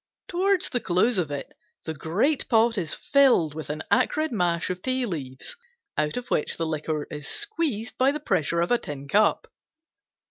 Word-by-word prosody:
Toward 375 +1 +2
the 245 - +1
close 190 +3 +2
of 165 -5 -1
it 140 -1 -5 0.3
the 160 - -3
great 195 - 0
pot 230 0 +4
is 170 -7 -2
filled 260 - +4
with 155 -1 -7
an 150 +1 -3
acrid 310 0 +2
mash 175 -5 0
of 180 0 -5
tea 255 +1 0
leaves, 145 - -5 0.4
out 150 +4 0
of 245 0 -6
which 150 - 0
the 165 - -1
liquor 155 -1 -2
is 150 -1 -6
squeezed 330 - -2
by 265 +2 +5
the 300 - -3
pressure 170 - 0
of 170 - 0
a 240 - +4
tin 140 -1 -7
cup. 210 +8 +3
185 Hz, 180 wpm, -26 LUFS, 155-260 Hz, 0.4 s, by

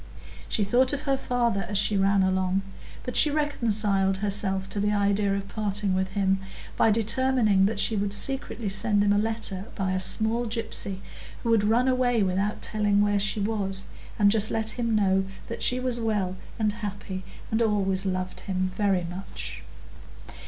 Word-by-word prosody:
She 215 - 0
thought 250 +7 +2
of 280 - -3
her 275 -2 +1
father 240 -6 -1
as 205 - 0
she 205 +1 +2
ran 195 0 +2
along, 190 0 0 0.4
but 250 - -6
she 300 - +5
reconciled 215 -10 0
herself 195 -1 0
to 205 - -3
the 205 +1 0
idea 200 -1 +1
of 200 0 -5
parting 205 -2 -2
with 190 0 0
him, 195 -1 +1 0.4
by - - +3
determining 225 -2 +2
that 210 -1 -3
she 220 - +1
would 200 -1 -1
secretly 240 0 +5
send 205 +1 +2
him 205 0 +3
a 205 - +2
letter 215 -3 -1
by 190 -2 -2
a 185 - -1
small 220 +5 +3
gypsy, 210 -4 -5 0.4
who 230 - 0
would 225 -3 +3
run 230 +4 +2
away 250 -3 +1
without 195 +3 -2
telling 210 -2 +1
where 205 0 +1
she 210 +1 -1
was, 200 -2 -1 0.3
and 205 -2 +4
just 215 -1 +3
let 220 -1 -1
him 230 -1 -2
know 195 -2 +2 0.2
that 230 - -7
she 250 - +2
was 255 -2 -1
well 210 -5 -1 0.2
and 215 -2 0
happy, 200 -3 -6 0.3
and 220 +1 0
always 195 -4 0
loved 185 -1 -3
him 185 -1 -3
very 195 -3 0
much. 170 - -7
205 Hz, 175 wpm, -25 LUFS, 195-225 Hz, 0.4 s, she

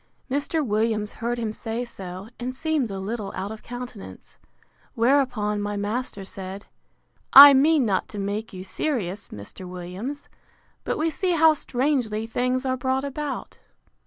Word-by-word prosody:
Mr. 290 +2 0
Williams 215 -1 0
heard 235 +1 -3
him 225 -2 -2
say 230 +2 -4
so, 190 -3 -8
and 250 +1 -4
seemed 305 -4 0
a 195 - -5
little 205 0 -4
out 195 +2 -4
of 220 - -8
countenance: 245 -3 -9 0.6
Whereupon 235 -4 +2
my 205 0 -2
master 205 -1 -3
said, 190 +1 -7 0.7
I 280 +1 +13
mean 285 0 +4
not 195 -4 0
to 210 - -8
make 205 +3 -3
you 185 -1 -7
serious, 205 - -2
Mr. 105 - -9
Williams; 185 +11 -6 0.6
but - - -1
we 320 +1 +1
see 365 +2 0
how 320 -1 +6
strangely 250 -6 -1
things 250 +3 -1
are 260 0 0
brought 260 +1 0
about. 280 0 -5
235 Hz, 150 wpm, -25 LUFS, 205-270 Hz, 0.7 s, I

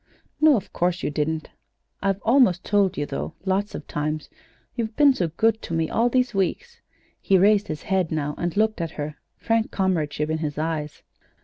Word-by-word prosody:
"No, 310 -2 +6
of 205 -4 -4
course 175 0 0
you - - -1
didn't. 155 +2 -2 0.5
I've 195 -1 0
almost 225 -8 +4
told 200 -2 +2
you, 145 - -1
though, 155 - -5
lots 195 +2 0
of 145 - -7
times; 150 +1 -3 0.4
you've 225 -2 -3
been 290 -2 +6
so 180 -9 -1
good 220 +7 +1
to 165 - -4
me 165 -1 0
all 235 +2 +2
these 250 -1 +1
weeks." 470 - -2 0.4
He 195 - +3
raised 205 +2 +4
his 155 -2 -5
head 190 -4 0
now, 150 -2 -1
and 175 +2 -3
looked 215 -3 +2
at 165 - -2
her, 150 0 -4 0.2
frank 225 -1 0
comradeship 155 -5 -1
in 160 - -1
his 150 -2 -3
eyes. 155 -1 -3
185 Hz, 190 wpm, -24 LUFS, 155-220 Hz, 0.5 s, No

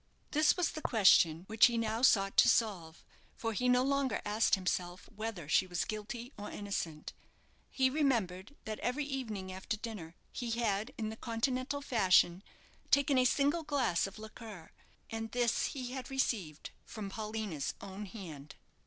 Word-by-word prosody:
This 305 +3 +4
was 360 - +1
the 310 - -6
question 180 - +5
which 220 +4 +6
he 235 -1 -1
now 225 0 -1
sought 195 -6 +4
to - - +7
solve, 180 -8 0 0.3
for 225 -1 -3
he 250 +4 +1
no 250 0 +4
longer 275 -1 +1
asked 210 +2 +3
himself 180 -1 -3
whether 215 -7 -5
she 185 +5 +3
was 175 -1 -1
guilty 230 +4 -6
or 205 - -6
innocent. 175 -7 -4 0.6
He 265 -1 +2
remembered 240 - 0
that 215 -1 -4
every 275 +4 -1
evening 220 -9 -4
after 190 +3 -4
dinner 205 -8 -7 0.2
he 240 -2 -4
had, 215 +1 0
in 220 0 -3
Continental 255 +5 -2
fashion, 185 -7 +4 0.5
taken 280 -1 +4
a 255 - +4
single 285 +6 +2
glass 260 - +1
of 195 - -11
liqueur; 215 -5 -10 0.4
and 225 0 -4
this 240 -2 +1
he 255 -3 -5
had 260 0 -6
received 210 - -2
from 205 -3 -7
Paulina's 215 -8 -4
own 200 +1 -7
hand. 160 -8 -9
220 Hz, 155 wpm, -33 LUFS, 190-255 Hz, 0.6 s, to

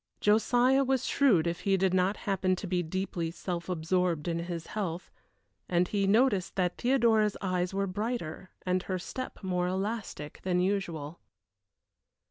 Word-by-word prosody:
Josiah 245 +5 +4
was 265 -1 +1
shrewd 215 - +3
if 170 0 -1
he 195 -1 +2
did 190 0 +2
happen 185 0 +1
to 185 - -6
be 180 -1 0
deeply 175 0 -3
self 170 +1 -5
absorbed 175 -1 0
in 170 -1 0
his 170 -1 -4
health, 180 -5 -4 0.6
and 175 0 +2
he 200 -2 +1
noticed 205 -3 +3
that 180 -2 0
Theodora's 230 -5 +3
eyes 180 -2 -1
were 195 0 0
brighter 195 -3 -4 0.2
and 185 0 +1
her 185 0 -3
step 255 +6 -6
more 180 -1 0
elastic 190 -5 -4
than 180 -1 +1
usual. 175 -5 -2
185 Hz, 145 wpm, -30 LUFS, 175-210 Hz, 0.6 s, Josiah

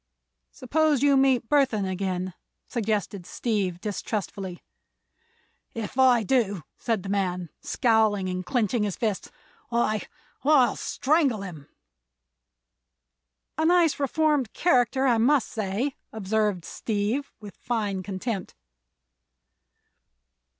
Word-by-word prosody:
"Suppose 295 +1 +1
you 285 -1 +5
meet 265 -3 +3
Burthon 265 -8 +2
again?" 185 -1 -2 0.3
suggested 205 -5 -2
Steve, 200 -7 -1
distrustfully. 195 -2 -4 1.1
"If 225 +2 -5
I 250 -3 +5
do," 205 -7 +1 0.2
said 225 -6 -1
the 195 - -6
man, 180 -4 -1
scowling 220 -8 +2
and 185 0 -3
clinching 240 0 0
his 205 -3 -1
fists, 215 -4 -2 0.4
"I—I'll 255 +4 +1
strangle 275 -7 +1
him!" 160 -7 -9 1.9
"A - - +2
nice, 345 -4 +3
reformed 290 -3 +1
character, 265 -5 +2
I 240 -4 +3
must 260 +1 +3
say," 220 +6 -2 0.2
observed 210 -3 -1
Steve, 220 +6 -2
with 205 -3 -11
fine 210 -6 -2
contempt. 195 +1 -4
220 Hz, 100 wpm, -26 LUFS, 195-265 Hz, 1.9 s, you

